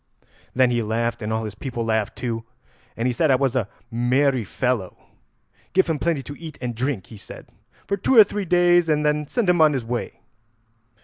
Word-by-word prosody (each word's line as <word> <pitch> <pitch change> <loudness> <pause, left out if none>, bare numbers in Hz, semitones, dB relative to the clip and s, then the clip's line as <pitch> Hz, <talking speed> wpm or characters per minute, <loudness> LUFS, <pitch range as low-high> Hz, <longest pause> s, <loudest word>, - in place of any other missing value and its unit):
Then 130 -1 +4
he 120 -1 +1
laughed, 115 +2 -2
and 105 0 -3
all 110 0 -1
his 105 - -6
people 120 +1 -5
laughed 110 -2 -1
too, 115 -2 -4 0.5
and 115 - -2
he - - +1
said 155 +6 +1
I 135 - +5
was 135 -1 0
a 110 -6 0 0.2
merry 125 +2 +1
fellow. 110 -2 -2 0.8
'Give 190 0 +4
him 160 -3 -2
plenty 155 -3 0
to 145 - -8
eat 160 -3 -9
and 125 -2 -3
drink,' 120 -4 -2
he - - -9
said, 100 - -11 0.4
'for 200 - -1
two 250 +6 +2
or 220 - +12
three 205 0 -4
days, 175 -1 +4
and 150 -1 +1
then 150 0 +1
send 235 - -1
him 175 -2 +3
on 155 -1 +5
his 130 -4 -3
way.' 120 +1 -4
130 Hz, 205 wpm, -23 LUFS, 115-155 Hz, 0.8 s, or